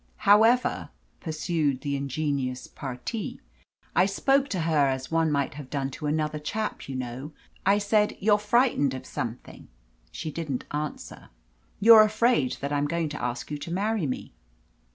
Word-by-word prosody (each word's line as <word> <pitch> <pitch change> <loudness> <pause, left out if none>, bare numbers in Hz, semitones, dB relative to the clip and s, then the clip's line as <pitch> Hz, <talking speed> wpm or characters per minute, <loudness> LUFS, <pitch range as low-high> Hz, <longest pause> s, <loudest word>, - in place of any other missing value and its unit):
"However," 225 +5 +4 0.3
pursued 155 -4 -1
the 140 -1 -2
ingenuous 140 -2 -2
parti, 135 - -6 0.6
"I 180 - +5
spoke 270 +7 +2
to 185 - -1
her 155 -3 +3
as 130 +1 -3
one 165 -1 +2
might 140 -2 0
have 140 -2 -9
done 135 -2 -2
to 150 - -5
another 150 0 -1
chap, 210 +3 -4
you 135 - -4
know. 130 +4 -5 0.3
I 200 +1 +5
said, 210 +1 +1
'You're 210 +1 +3
frightened 210 - +2
of 130 0 -8
something.' 115 -1 -6 0.4
She 155 - -5
didn't 150 -6 -4
answer. 150 0 -5 0.5
'You're 220 +1 +9
afraid 215 - +2
that 140 +1 -2
I'm 145 0 +1
going 165 0 -1
to 150 -4 -6
ask 125 +4 -3
you 150 - -3
to 165 - -7
marry 200 -1 0
me.' 130 - -5
155 Hz, 155 wpm, -26 LUFS, 140-205 Hz, 0.6 s, You're